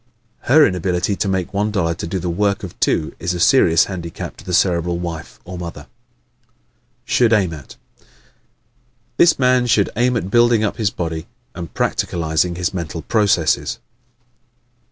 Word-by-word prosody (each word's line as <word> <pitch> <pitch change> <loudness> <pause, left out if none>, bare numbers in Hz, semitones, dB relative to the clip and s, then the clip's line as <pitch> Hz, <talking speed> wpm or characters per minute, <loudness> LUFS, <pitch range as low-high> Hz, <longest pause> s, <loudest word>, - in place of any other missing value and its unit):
Her 150 +3 +7
inability 90 +2 -1
to - - -1
make 95 -1 -2
one 105 +1 0
dollar 90 -6 0
do 85 +2 -4
the 90 0 -4
work 100 +4 0
of 95 - -6
two 75 - 0
is 90 0 -2
a - - -4
serious 85 - +4
handicap 85 -4 -6
to - - -13
the 90 - -6
Cerebral 85 -1 +1
wife 85 -2 -6
or 90 -1 -7
mother. 85 -4 -7 1.2
Should 120 -2 +2
Aim 95 -7 +2
At 75 -5 -11 0.2
¶ - - -28 1.1
This 170 - +5
man 125 -1 +3
should 105 -4 +2
aim 120 +2 +2
at 95 -3 -4
building 120 -1 +4
up 105 - -1
his 110 -3 +1
body 80 -4 -5 0.3
and 85 -2 -7
practicalizing 85 +1 0
his 90 +1 -1
mental 85 -3 -5
processes. 105 -7 +1
90 Hz, 155 wpm, -19 LUFS, 85-105 Hz, 1.2 s, Her